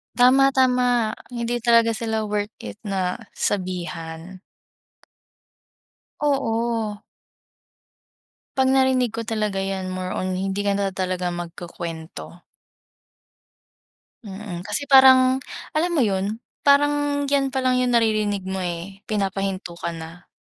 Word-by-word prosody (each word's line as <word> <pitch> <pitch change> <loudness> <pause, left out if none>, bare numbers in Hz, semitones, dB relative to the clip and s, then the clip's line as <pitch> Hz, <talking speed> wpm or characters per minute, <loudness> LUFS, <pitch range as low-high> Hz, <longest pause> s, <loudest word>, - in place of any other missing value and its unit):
Tama, 265 +2 +6
tama. 250 -4 +2 0.2
Hindi 240 -1 -2
talaga 230 -1 +4
sila 220 -1 -2
worth 205 0 -2
it - - -7
na 190 -3 -1 0.2
sabihan. 180 -2 -4 1.8
Oo. 230 -6 0 1.6
Pag 265 0 +4
narinig 260 -3 +2
ko 230 - -3
talaga 215 -4 -1
yan 195 -1 -3
more 185 0 -4
on 185 0 -2
hindi 195 +1 -2
ka 200 - +2
na 200 -1 0
talaga 185 -1 -2
magkukuwento. 170 -1 -7 1.8
Mm, 195 -3 -7
kasi 210 +9 -3
parang 260 -1 +7 0.3
alam 320 +3 +1
mo - - +4
yun, 200 +1 -1 0.2
parang 290 0 +3
yan 275 -1 +1
palang 255 -1 +1
yung 250 - +1
naririnig 215 -4 +1
mo, 190 0 -3
eh, 180 +2 -5
pinapahinto 195 -3 -2
ka 170 0 -4
na. 165 +1 -9
210 Hz, 110 wpm, -23 LUFS, 185-250 Hz, 1.8 s, parang